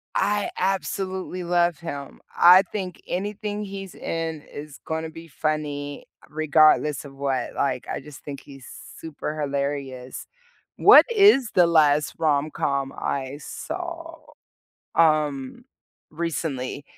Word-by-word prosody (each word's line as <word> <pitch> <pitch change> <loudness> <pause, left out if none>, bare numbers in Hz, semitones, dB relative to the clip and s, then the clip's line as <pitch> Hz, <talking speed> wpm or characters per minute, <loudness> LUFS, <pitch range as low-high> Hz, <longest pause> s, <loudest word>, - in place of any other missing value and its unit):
I 205 0 +1
absolutely 185 0 -2
love 175 -2 +2
him. 145 -5 -7 0.2
I 180 +2 +8
think 185 -2 -6
anything 210 +2 -3
he's 195 -2 -8
in 165 -2 -4
is 145 0 -10
gonna 160 0 -3
be 165 +1 -11
funny, 145 -1 -3 0.2
regardless 155 -1 +3
of 140 - -11
what, 135 -1 -2
like, - - -1
I - - -3
just 150 -2 -12
think 140 -2 -7
he's 135 -2 -13 0.3
super 155 -1 -5
hilarious. 140 -3 -3 0.5
What - - +8
is 395 - +5
the 175 -2 +6
last 150 -3 +3
rom-com 140 -2 0
I 135 +1 -3
saw, 330 - -6 0.8
um, 155 - +1 0.5
recently? 150 -4 -3
155 Hz, 115 wpm, -24 LUFS, 145-185 Hz, 0.8 s, I